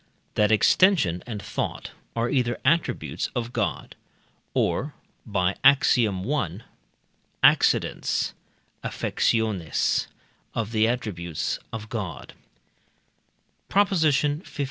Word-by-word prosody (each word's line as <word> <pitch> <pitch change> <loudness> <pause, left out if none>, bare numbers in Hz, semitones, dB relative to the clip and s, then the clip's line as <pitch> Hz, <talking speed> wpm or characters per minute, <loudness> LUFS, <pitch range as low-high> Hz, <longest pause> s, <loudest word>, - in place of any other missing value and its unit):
That 105 0 +2
extension 110 - +4
and 105 -5 -5
thought - - -4 0.2
are 115 0 0
either 120 -3 0
attributes 165 +5 0
of 120 -1 -3
God - - -2 0.6
or 145 +3 0 0.3
(by 95 -3 0
Ax. 140 0 +6
i.) 105 - -1 0.8
accidents - - +3 0.5
(affectiones) 110 -8 0 0.5
of 115 -1 -2
the 110 -1 +3
attributes 95 -10 -3
of 110 -1 -6
God. 110 -7 -5 1.4
PROP. 200 0 +3
XV. 150 -3 +2
115 Hz, 90 wpm, -25 LUFS, 100-140 Hz, 1.4 s, Ax